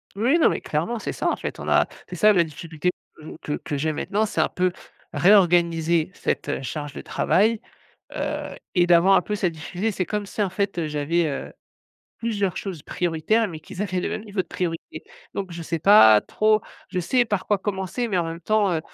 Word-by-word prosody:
Oui, 245 Hz, +11 st, +3 dB
non, -, -, +5 dB
mais -, -, -1 dB
clairement, 170 Hz, +10 st, -2 dB
c'est -, -, -4 dB
ça, -, -, -1 dB
en -, -, +1 dB
fait. -, -, -6 dB
On -, -, -5 dB
a -, -, +4 dB, 0.2 s
c'est 180 Hz, -, -7 dB
ça 210 Hz, +4 st, +6 dB
la 175 Hz, -3 st, +4 dB
difficulté 160 Hz, +2 st, -4 dB, 0.3 s
que 155 Hz, 0 st, -11 dB
que 150 Hz, -, -3 dB
que 145 Hz, -, -4 dB
j'ai 155 Hz, +2 st, -1 dB
maintenant, 210 Hz, +7 st, 0 dB
c'est 210 Hz, -, -1 dB
un -, -, +1 dB
peu 180 Hz, 0 st, 0 dB, 0.4 s
réorganiser 170 Hz, -3 st, +3 dB
cette, -, -, -2 dB
heu, -, -, -2 dB
charge 145 Hz, +1 st, -5 dB
de -, -, -7 dB
travail, 220 Hz, +4 st, +1 dB, 0.5 s
heu -, -, -3 dB, 0.3 s
et 175 Hz, -1 st, +5 dB
d'avoir 175 Hz, +3 st, +5 dB
un 190 Hz, -, +4 dB
peu 210 Hz, -, -3 dB
cette 185 Hz, -4 st, 0 dB
difficulté. 175 Hz, +7 st, -3 dB
C'est 185 Hz, -3 st, -2 dB
comme 210 Hz, -1 st, -3 dB
si 205 Hz, -, -6 dB
en 195 Hz, -, 0 dB
fait, 200 Hz, 0 st, -2 dB
heu, 165 Hz, -, 0 dB
j'avais, 150 Hz, +3 st, 0 dB
heu, 140 Hz, -3 st, -4 dB, 0.7 s
plusieurs 205 Hz, -5 st, -1 dB
choses 180 Hz, -7 st, -5 dB
prioritaires, 175 Hz, +9 st, 0 dB
mais 160 Hz, -4 st, -8 dB
qu'ils 180 Hz, -, -10 dB
avaient 185 Hz, -3 st, -1 dB
le -, -, -2 dB
même 215 Hz, -, -4 dB
niveau 200 Hz, -3 st, -2 dB
de -, -, -25 dB
priorité. 165 Hz, -1 st, -5 dB, 0.3 s
Donc 190 Hz, -3 st, -4 dB
je 170 Hz, 0 st, -6 dB
sais 165 Hz, +1 st, -3 dB
pas 155 Hz, -, +7 dB
trop 215 Hz, -, +2 dB, 0.3 s
je -, -, -3 dB
sais 245 Hz, +8 st, +2 dB
par 205 Hz, -4 st, -2 dB
quoi 205 Hz, -, +3 dB
commencer, 195 Hz, +4 st, -3 dB
mais 190 Hz, -4 st, 0 dB
en 170 Hz, -, +1 dB
même 165 Hz, +1 st, -5 dB
temps, 205 Hz, +1 st, +2 dB
heu, 160 Hz, -, 0 dB
180 Hz, 220 wpm, -24 LUFS, 165-205 Hz, 0.7 s, pas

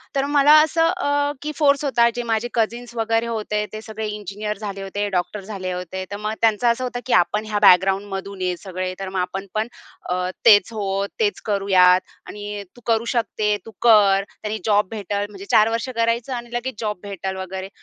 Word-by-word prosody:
तर 275 Hz, 0 st, +1 dB
मला 290 Hz, 0 st, +4 dB
असं 325 Hz, +1 st, +2 dB
अ, 290 Hz, -5 st, 0 dB
की 300 Hz, +1 st, -3 dB
फोर्स 285 Hz, -2 st, +3 dB
होता 235 Hz, -3 st, +3 dB
जे 240 Hz, -, -2 dB
माझे 225 Hz, 0 st, -1 dB
कझिन्स 235 Hz, +1 st, -2 dB
वगैरे 225 Hz, +1 st, 0 dB
होते. 210 Hz, -2 st, -2 dB
ते 215 Hz, -, -6 dB
सगळे 220 Hz, -1 st, -5 dB
इंजिनिअर 210 Hz, 0 st, -5 dB
झाले 200 Hz, -2 st, -6 dB
होते, 205 Hz, +1 st, -3 dB
डॉक्टर 190 Hz, +2 st, -2 dB
झाले 190 Hz, -3 st, -5 dB
होते. 180 Hz, +1 st, -5 dB
तर 205 Hz, -, -4 dB
मग 215 Hz, +1 st, -3 dB
त्यांचं 225 Hz, +1 st, +3 dB
असं 235 Hz, +2 st, +2 dB
होतं 245 Hz, -1 st, -3 dB
की 255 Hz, -, -1 dB
आपण 180 Hz, +5 st, +2 dB
ह्या 210 Hz, -1 st, -1 dB
बॅकग्राऊंडमधून 195 Hz, +1 st, +3 dB
आहे 180 Hz, -1 st, 0 dB
सगळे. 185 Hz, -1 st, -5 dB
तर 190 Hz, -1 st, -4 dB
मग 190 Hz, -1 st, -3 dB
"आपण 190 Hz, +2 st, -3 dB
पण 215 Hz, +2 st, -1 dB, 0.4 s
अ, 180 Hz, 0 st, -1 dB, 0.2 s
तेच 205 Hz, -1 st, +7 dB
हो, 195 Hz, -2 st, -1 dB
तेच 415 Hz, -2 st, 0 dB
करूयात 190 Hz, -3 st, +4 dB, 0.3 s
आणि 205 Hz, 0 st, -6 dB
तू 245 Hz, -, -16 dB
करू 230 Hz, 0 st, +1 dB
शकते, 210 Hz, -2 st, 0 dB
तू 225 Hz, -, -10 dB
कर. 205 Hz, -4 st, +5 dB, 0.2 s
त्याने 215 Hz, 0 st, -3 dB
जॉब 205 Hz, -2 st, +3 dB
भेटेल." 205 Hz, -1 st, -3 dB
म्हणजे 200 Hz, -1 st, -10 dB
4 215 Hz, +1 st, +5 dB
वर्ष 230 Hz, +3 st, -2 dB
करायचं 230 Hz, +3 st, 0 dB
आणि 240 Hz, 0 st, -6 dB
लगेच 240 Hz, 0 st, -3 dB
जॉब 210 Hz, -4 st, -3 dB
भेटेल 190 Hz, -1 st, -5 dB
वगैरे. 190 Hz, +1 st, -6 dB
210 Hz, 195 wpm, -22 LUFS, 195-235 Hz, 0.4 s, तेच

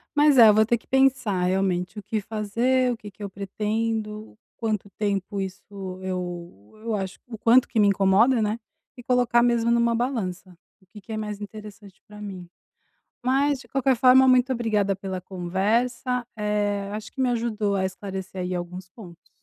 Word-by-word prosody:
Mas, 290 Hz, -2 st, +5 dB
é, 225 Hz, -3 st, +9 dB
vou 215 Hz, +1 st, +4 dB
ter 235 Hz, +2 st, +2 dB
que 230 Hz, -, -26 dB
pensar, 265 Hz, -8 st, +2 dB
realmente, 185 Hz, +1 st, 0 dB
o 210 Hz, -, -6 dB
que 215 Hz, +2 st, -2 dB
fazer, 230 Hz, +5 st, 0 dB
o 235 Hz, -, -3 dB
que 210 Hz, -2 st, -10 dB
que 205 Hz, +2 st, -12 dB
eu 200 Hz, -, -4 dB
pretendo, 215 Hz, +2 st, -3 dB, 0.2 s
quanto 215 Hz, -3 st, -2 dB
tempo 200 Hz, -1 st, -2 dB
isso 190 Hz, -1 st, -5 dB, 0.4 s
eu 175 Hz, -, -6 dB
eu 225 Hz, -2 st, -1 dB
acho 190 Hz, -1 st, -4 dB
o 225 Hz, -2 st, -8 dB
quanto 240 Hz, +4 st, +4 dB
que 225 Hz, -, -1 dB
me 205 Hz, -, +5 dB
incomoda, 200 Hz, +5 st, +4 dB
né. 215 Hz, +2 st, -1 dB, 0.4 s
E -, -, -9 dB
colocar, 245 Hz, -1 st, +3 dB
mesmo, 235 Hz, -1 st, +2 dB
numa 235 Hz, 0 st, +3 dB
balança, 210 Hz, -7 st, -3 dB, 0.3 s
o -, -, -25 dB
que 210 Hz, +2 st, -13 dB
que 220 Hz, +3 st, -9 dB
é 220 Hz, -, -3 dB
mais 210 Hz, -1 st, -4 dB
interessante 205 Hz, -1 st, -11 dB
pra 210 Hz, 0 st, -12 dB
mim. 185 Hz, -4 st, -7 dB, 0.8 s
Mas, 275 Hz, +2 st, +2 dB
de -, -, -15 dB
qualquer 270 Hz, -1 st, +1 dB
forma, 260 Hz, +2 st, +6 dB
muito 255 Hz, 0 st, +4 dB
obrigada 215 Hz, -5 st, 0 dB
pela 190 Hz, -1 st, -5 dB
conversa. 225 Hz, +8 st, -1 dB
Eh, 205 Hz, -1 st, -1 dB
acho 215 Hz, +1 st, -6 dB
que 265 Hz, -, -8 dB
me 250 Hz, -, +2 dB
ajudou 220 Hz, -4 st, -1 dB
a 190 Hz, -1 st, +1 dB
esclarecer 190 Hz, -1 st, -6 dB
aí 180 Hz, 0 st, -3 dB
alguns 180 Hz, +1 st, -6 dB
pontos. 180 Hz, -5 st, -14 dB
210 Hz, 180 wpm, -24 LUFS, 195-235 Hz, 0.8 s, é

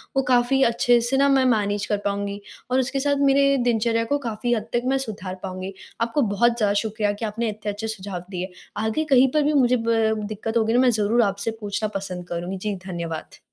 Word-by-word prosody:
वो 270 Hz, -, +4 dB
काफ़ी 255 Hz, +1 st, +3 dB
अच्छे 240 Hz, +1 st, +3 dB
से 240 Hz, +3 st, 0 dB
ना 280 Hz, +1 st, +4 dB
मैं 270 Hz, -1 st, +4 dB
मैनेज 205 Hz, -4 st, +1 dB
कर 210 Hz, -, 0 dB
पाऊँगी 200 Hz, 0 st, -2 dB, 0.3 s
और 255 Hz, -, +3 dB
उसके 265 Hz, +2 st, -1 dB
साथ 285 Hz, +1 st, +1 dB
मेरे 275 Hz, 0 st, +4 dB
दिनचर्या 230 Hz, 0 st, +1 dB
को 285 Hz, +5 st, +1 dB
काफ़ी 235 Hz, +2 st, -1 dB
हद 220 Hz, -1 st, -2 dB
तक 240 Hz, -, +2 dB
मैं 265 Hz, +1 st, +2 dB
सुधार 190 Hz, -4 st, -6 dB
पाऊँगी। 185 Hz, 0 st, -5 dB, 0.3 s
आपको 230 Hz, +5 st, +1 dB
बहुत 235 Hz, +3 st, +3 dB
ज़्यादा 210 Hz, -3 st, +2 dB
शुक्रिया 215 Hz, -1 st, -1 dB
कि -, -, 0 dB
आपने 220 Hz, +2 st, -2 dB
इतने 210 Hz, 0 st, -4 dB
अच्छे 210 Hz, +2 st, -5 dB
सुझाव 195 Hz, -4 st, -5 dB
दिए। 185 Hz, -1 st, -5 dB, 0.3 s
आगे 220 Hz, +8 st, 0 dB
कहीं 260 Hz, +1 st, +7 dB
पर 305 Hz, +1 st, +2 dB
भी 300 Hz, +1 st, +1 dB
मुझे 255 Hz, -3 st, +4 dB
ब 225 Hz, -1 st, +3 dB
दिक्कत 220 Hz, +2 st, -3 dB
होगी 225 Hz, 0 st, +2 dB
ना, 245 Hz, -, +4 dB
मैं 255 Hz, 0 st, +5 dB
ज़रूर 220 Hz, +2 st, +2 dB
आपसे 200 Hz, 0 st, 0 dB
पूछना 205 Hz, +1 st, -2 dB
पसंद 180 Hz, -2 st, -7 dB
करुँगी। 170 Hz, 0 st, -4 dB
जी, 205 Hz, +2 st, -3 dB
धन्यवाद। 170 Hz, -3 st, -5 dB
220 Hz, 215 wpm, -23 LUFS, 200-245 Hz, 0.3 s, कहीं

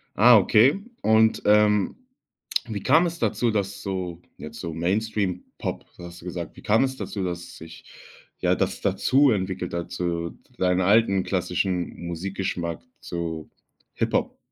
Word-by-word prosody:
Ah, 120 Hz, +3 st, +8 dB
okay. 110 Hz, -, +4 dB, 0.2 s
Und, 110 Hz, 0 st, +4 dB
ähm, 105 Hz, -1 st, +4 dB, 0.7 s
wie 105 Hz, -3 st, -5 dB
kam 160 Hz, +6 st, +5 dB
es 170 Hz, -1 st, -3 dB
dazu, 120 Hz, -, +1 dB
dass 100 Hz, -2 st, -2 dB
so, 90 Hz, -3 st, -4 dB, 0.2 s
jetzt -, -, -9 dB
so 85 Hz, -2 st, -5 dB
Mainstream 95 Hz, +2 st, -1 dB
Pop, -, -, -4 dB
so -, -, -13 dB
hast 85 Hz, 0 st, -10 dB
du -, -, -14 dB
gesagt 90 Hz, -2 st, -6 dB
wie -, -, -11 dB
kam 110 Hz, +4 st, +3 dB
es 130 Hz, 0 st, -2 dB
dazu, 100 Hz, -6 st, -4 dB
dass 90 Hz, -1 st, -5 dB
sich, 80 Hz, +1 st, -12 dB, 0.5 s
ja, -, -, +2 dB
das -, -, -2 dB
dazu 135 Hz, +1 st, +3 dB
entwickelt 95 Hz, -3 st, -2 dB
dazu 85 Hz, -1 st, -3 dB, 0.2 s
deine 90 Hz, 0 st, +2 dB
alten, 100 Hz, -1 st, +4 dB
klassischen 90 Hz, -1 st, -2 dB
Musikgeschmack, 85 Hz, -1 st, -3 dB, 0.2 s
so 85 Hz, -3 st, -5 dB, 0.4 s
Hip-Hop? -, -, -1 dB
95 Hz, 145 wpm, -25 LUFS, 85-110 Hz, 0.7 s, Ah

